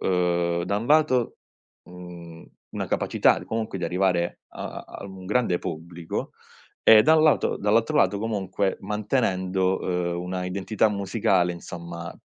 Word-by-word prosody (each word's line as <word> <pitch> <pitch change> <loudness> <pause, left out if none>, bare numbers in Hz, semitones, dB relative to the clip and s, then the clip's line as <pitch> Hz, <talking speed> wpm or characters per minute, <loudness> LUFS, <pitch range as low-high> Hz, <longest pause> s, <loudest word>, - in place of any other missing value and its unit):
ehm, 85 -1 +1
da 100 +3 -1
un 115 - -5
lato, 150 -5 +3 0.5
uhm, 85 -2 -11 0.3
una - - -3
capacità - - +2
comunque 110 -3 -3
di 90 - -3
arrivare 90 0 0
a - - -7
a - - -15
a - - -8
un 95 -1 -10
grande 105 -4 +1
pubblico 85 +1 -5 0.5
e 110 -1 +8
da 160 +5 +5
un 155 - +4
lato 155 -2 +3
dall'altro 110 +3 +2
lato, 100 +2 +3
comunque, 100 -3 -1
mantenendo, 95 -3 0 0.3
ehm, 85 - -3
una 90 0 -4
identità 95 +4 0
musicale, 100 -3 +1
insomma, 85 0 -8
95 Hz, 140 wpm, -25 LUFS, 90-105 Hz, 0.5 s, e